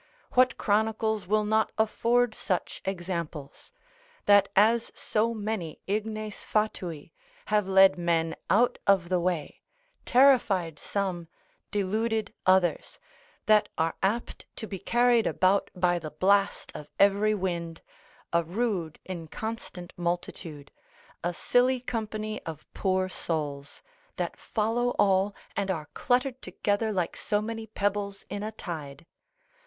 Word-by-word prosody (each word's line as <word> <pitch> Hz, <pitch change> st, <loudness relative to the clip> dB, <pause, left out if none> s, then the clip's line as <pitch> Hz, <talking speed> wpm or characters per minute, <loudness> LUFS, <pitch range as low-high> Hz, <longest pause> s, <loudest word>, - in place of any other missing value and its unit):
what 255 Hz, 0 st, +4 dB
chronicles 220 Hz, -1 st, 0 dB
will 215 Hz, +2 st, +2 dB
not 220 Hz, +1 st, +2 dB
afford 235 Hz, +2 st, +2 dB
such 185 Hz, -4 st, -2 dB
examples? 170 Hz, -6 st, -5 dB, 0.5 s
that 205 Hz, -1 st, +6 dB
as 225 Hz, +3 st, +4 dB
so 225 Hz, +2 st, 0 dB
many 210 Hz, -7 st, -4 dB
ignes 215 Hz, +1 st, -3 dB
fatui, 185 Hz, -7 st, -2 dB, 0.4 s
have 210 Hz, -2 st, +3 dB
led 190 Hz, -1 st, +6 dB
men 165 Hz, -1 st, +1 dB
out 235 Hz, +5 st, +3 dB
of 190 Hz, -4 st, +4 dB
the 180 Hz, -1 st, +2 dB
way, 175 Hz, -4 st, -2 dB, 0.4 s
terrified 230 Hz, -, +4 dB
some, 185 Hz, -4 st, -3 dB, 0.4 s
deluded 215 Hz, +2 st, -1 dB
others, 185 Hz, -2 st, +2 dB, 0.5 s
that 215 Hz, -1 st, +4 dB
are 160 Hz, +1 st, 0 dB
apt 210 Hz, +5 st, -2 dB
to -, -, -6 dB
be 195 Hz, -3 st, -6 dB
carried 240 Hz, +2 st, +3 dB
about 190 Hz, +2 st, +2 dB
by 175 Hz, -1 st, +2 dB
the 155 Hz, -2 st, -6 dB
blast 195 Hz, +6 st, +1 dB
of 150 Hz, -, -8 dB
every 200 Hz, +2 st, +4 dB
wind, 170 Hz, -4 st, -3 dB, 0.5 s
a 170 Hz, 0 st, +3 dB
rude 180 Hz, -3 st, -2 dB
inconstant 180 Hz, +1 st, -6 dB
multitude, 170 Hz, -4 st, -4 dB, 0.5 s
a 175 Hz, -, 0 dB
silly 250 Hz, +8 st, +2 dB
company 215 Hz, -3 st, -4 dB
of 160 Hz, -2 st, -8 dB
poor 185 Hz, -1 st, +1 dB
souls, 145 Hz, -6 st, -4 dB, 0.3 s
that -, -, -3 dB
follow 235 Hz, +3 st, -1 dB
all, 195 Hz, 0 st, +3 dB, 0.2 s
and 195 Hz, -, -1 dB
are 155 Hz, -5 st, -3 dB
cluttered 255 Hz, +1 st, 0 dB
together 210 Hz, +2 st, -1 dB
like 180 Hz, -4 st, -1 dB
so 205 Hz, -, 0 dB
many 225 Hz, +1 st, -5 dB
pebbles 200 Hz, -1 st, -2 dB
in 205 Hz, -, -3 dB
a 215 Hz, +1 st, -3 dB
tide. 155 Hz, -8 st, -7 dB
200 Hz, 125 wpm, -28 LUFS, 175-220 Hz, 0.5 s, that